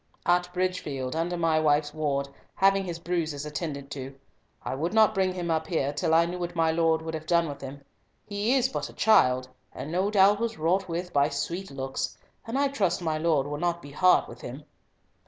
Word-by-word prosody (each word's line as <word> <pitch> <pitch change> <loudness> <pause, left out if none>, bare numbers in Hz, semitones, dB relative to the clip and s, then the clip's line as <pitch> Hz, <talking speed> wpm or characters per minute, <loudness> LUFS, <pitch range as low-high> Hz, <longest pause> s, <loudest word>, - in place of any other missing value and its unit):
"At 175 0 +2
Bridgefield, 160 -8 -2
under 170 +2 -1
my 165 -2 +2
wife's 150 -1 +2
ward, 140 -3 -1 0.3
having 195 0 +3
his 170 -2 -4
bruises 165 -4 -2
attended 150 -2 -5
to. 135 -1 -6 0.5
I - - -3
would 165 +9 -2
not 220 -1 +5
bring 190 -2 +1
him 175 -2 -2
up 160 0 0
here 145 -4 0
till 160 +2 +1
I 165 +1 +5
knew 180 +1 -5
what 175 0 -4
my 165 -1 +3
Lord 160 -1 +2
would 160 0 -5
have 155 0 -6
done 170 -1 +3
with 140 -1 -7
him. 140 +1 -8 0.4
He 205 +5 0
is 260 -1 +3
but 265 - -4
a - - -13
child, 130 -12 +4 0.2
and 150 - -7
no 185 +4 +1
doubt 205 0 +5
was 230 -1 -2
wrought 180 +5 +1
with 175 +2 -4
by 140 +1 +3
sweet 170 +6 -3
looks, 135 -1 -4 0.3
and 230 +4 -2
I 280 0 +2
trust 190 -10 0
my 155 -2 -1
Lord 155 -4 +2
will 145 0 -4
not 170 0 0
be 145 -4 -11
hard 185 +5 +4
with 120 +1 -11
him." 130 +5 -8
165 Hz, 210 wpm, -27 LUFS, 145-185 Hz, 0.5 s, not